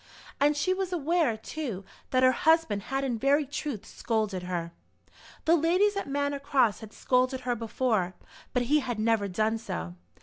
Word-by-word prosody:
And 295 +1 +3
she 370 +5 +2
was 375 -1 -3
aware, 325 -7 +1
too, 220 -5 -5 0.2
that 255 0 +2
her 255 - +7
husband 315 -7 +2
had 270 0 -1
in 245 -4 -1
very 285 +4 +3
truth 285 -5 -5
scolded 215 -5 -2
her. 175 -2 -3 0.7
The 330 - +5
ladies 365 +6 +3
at 395 -7 -3
Manor 285 0 -1
Cross 265 -6 +2
had 220 -2 -10
scolded 255 +2 +1
her 245 -1 -1
before, 220 -5 -1 0.4
but 250 -2 +1
he 295 +5 +3
had 245 -5 -3
never 215 -2 +1
done 215 +4 0
so. 85 - -5
255 Hz, 170 wpm, -28 LUFS, 220-295 Hz, 0.7 s, her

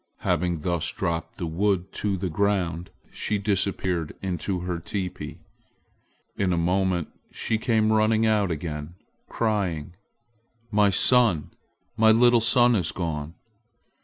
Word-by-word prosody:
Having 85 -1 0
thus 85 0 -1
dropped 85 -2 -3
the 85 - -3
wood 95 +2 0
to 100 -2 -1
the 95 - -2
ground, 90 -2 0 0.2
she 105 - -2
disappeared 95 -4 -1
into 90 0 -3
her 90 -1 -3
teepee. 90 +1 -5 1.0
In 95 -2 0
a 85 - +1
moment 90 -1 0 0.2
she 110 -1 -2
came 110 -2 +2
running 110 +1 +3
out 105 -3 +2
again, 75 0 -5 0.3
crying, 95 -8 -1 0.8
"My 105 -1 +4
son! 105 - +3 0.5
My 110 0 +6
little 120 +1 +5
son 120 +2 +4
is 95 - 0
gone!" 80 -2 -4
95 Hz, 125 wpm, -25 LUFS, 85-110 Hz, 1.0 s, My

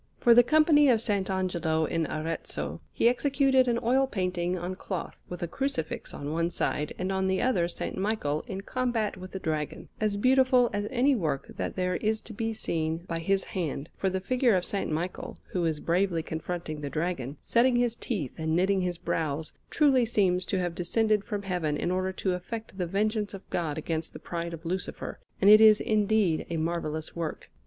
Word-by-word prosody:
For 240 - +6
the 240 - +9
Company 295 +2 +5
of 245 - +6
S. 220 -1 -2
Angelo 185 -5 0
in 165 +1 -1
Arezzo 85 - -4
he - - +2
executed 265 0 +3
an 235 -1 +2
oil 265 +3 +3
painting 180 -4 -1
on 175 +1 -4
cloth, 185 -1 -5
with 180 0 -5
a - - -1
Crucifix 265 - -3
on 145 +1 -5
one 165 +1 +1
side, 150 -3 -1
and 185 +1 -2
on 190 0 0
the 190 0 +1
other 205 -10 +2
S. 170 - -6 0.2
Michael 190 -8 -1
in 195 -4 -4
combat 240 -1 -1
with 185 0 -9
the 190 - -6
Dragon, 155 -4 -3
as 210 -2 0
beautiful 255 +1 +4
as 205 0 -1
any 265 +2 +3
work 155 - -2
that - - -3
there 180 -1 0
is 220 0 0
to 220 - -9
be 225 +2 -2
seen 165 -5 -2
by 165 -1 -2
his 195 +3 +1
hand; 155 -5 -4
for 190 - 0
the 190 0 -1
figure 245 +2 +2
of 180 - +1
S. 200 - 0
Michael, 170 +4 -4
who 175 -2 0
is 160 -2 0
bravely 170 0 +1
confronting 160 -1 -4
the 145 - -3
Dragon, 150 -4 -3
setting 245 +2 +3
his 240 -1 +2
teeth 190 - -3
and 160 0 0
knitting 190 +2 +2
his 180 -1 -1
brows, 155 -2 -2 0.2
truly 275 -5 +4
seems 190 -6 +1
to 195 - 0
have 175 -2 -1
descended 210 +4 +1
from 205 -3 -4
Heaven 175 -6 -1
in 175 - -1
order 185 +1 0
to 190 0 -1
effect 220 +4 -6
the 180 -2 -2
vengeance 210 +2 0
of 195 - -12
God 160 -3 -1
against 160 0 -3
the - - -7
pride 170 -1 -4
of 165 +1 -15
Lucifer, 180 +2 -4 0.2
and 195 - +3
it 215 +1 +9
is 215 -1 +8
indeed 210 -5 +1
a 170 - -2
marvellous 160 -1 -3
work. 165 -2 -5
185 Hz, 200 wpm, -28 LUFS, 165-220 Hz, 0.2 s, the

